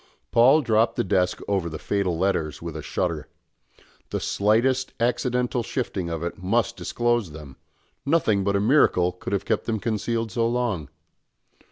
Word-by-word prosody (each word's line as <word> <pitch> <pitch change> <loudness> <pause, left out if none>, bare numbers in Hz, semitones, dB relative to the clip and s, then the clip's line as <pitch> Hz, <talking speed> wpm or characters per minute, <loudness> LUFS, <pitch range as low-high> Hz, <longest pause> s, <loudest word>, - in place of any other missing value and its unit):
Paul 135 +6 +5
dropped 115 -1 +2
the - - 0
desk 90 -2 0
over 95 -4 0
the 80 - -6
fatal 95 -1 -1
letters 85 -5 0
with 85 -2 -7
a 80 - -4
shudder. - - -2 0.8
The - - -2
slightest 120 +6 +1
accidental 125 +1 0
shifting 105 -7 -3
of 85 0 -4
it 85 +2 -5
must 115 +5 +1
disclose 120 -8 -1
them 75 -4 -10 0.5
nothing 135 -10 +2
but 100 +1 +1
a - - +3
miracle 100 -6 +3
could 90 - -8
have 100 - -1
kept 110 - 0
them 110 -2 0
concealed 115 +1 -2
so 115 0 +1
long. 115 - -1
105 Hz, 160 wpm, -24 LUFS, 90-120 Hz, 0.8 s, Paul